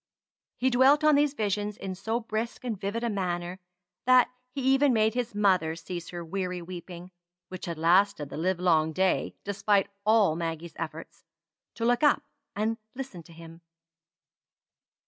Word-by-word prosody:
He 260 +1 +1
dwelt 270 +5 +5
on 305 0 +6
these 290 0 +3
visions 210 -1 -1
in 190 -1 -5
so 220 +5 -2
brisk 225 +1 -4
and 240 -3 -2
vivid 200 +4 -3
a 235 - 0
manner, 180 -2 -3 0.5
that 255 -1 +6 0.2
he 270 +2 -5
even 270 +1 +4
made 220 -1 +3
his 245 -3 -3
mother 185 -6 +2
cease 175 +1 -7
her 175 -1 -6
weary 180 +1 -3
weeping 175 0 -9 0.4
(which 185 -1 -7
had 170 -2 -4
lasted 170 -1 +3
the - - -6
livelong 170 -2 +2
day, 190 +3 +1
despite 200 0 +1
all 210 -6 +4
Maggie's 165 0 -4
efforts) 165 0 -7 0.5
to 230 - -2
look 245 0 +2
up 295 -1 +4 0.3
and 220 +2 -1 0.2
listen 255 -10 -7
to 165 - -17
him. 165 0 -13
195 Hz, 155 wpm, -28 LUFS, 175-230 Hz, 0.5 s, on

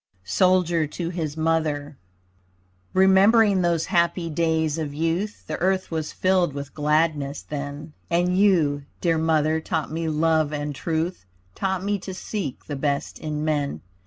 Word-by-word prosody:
SOLDIER 175 - +2
TO 170 +3 -4
HIS 160 -4 -4
MOTHER 155 -2 0 1.0
Remembering 195 +2 +5
those 170 -2 +1
happy 170 -2 +1
days 160 -1 0
of 145 -2 -4
youth 165 +7 -2
The - - -4
earth 190 0 +1
was 160 -2 -2
filled 185 -4 +1
with 140 0 -6
gladness 150 -1 0
then, 145 +1 -6 0.2
And 175 +1 +2
you, 165 -8 +3
dear 165 -2 +1
Mother, 160 0 +2
taught 160 -1 -2
me 165 0 -2
love 155 -1 +2
and 145 -1 -3
truth, 160 - -3 0.3
Taught 190 - -2
me 205 0 0
to 190 0 -7
seek 190 - -5
the 145 - -4
best 140 0 -2
in 155 -1 -3
men. 145 -2 -1
160 Hz, 145 wpm, -24 LUFS, 150-180 Hz, 1.0 s, Remembering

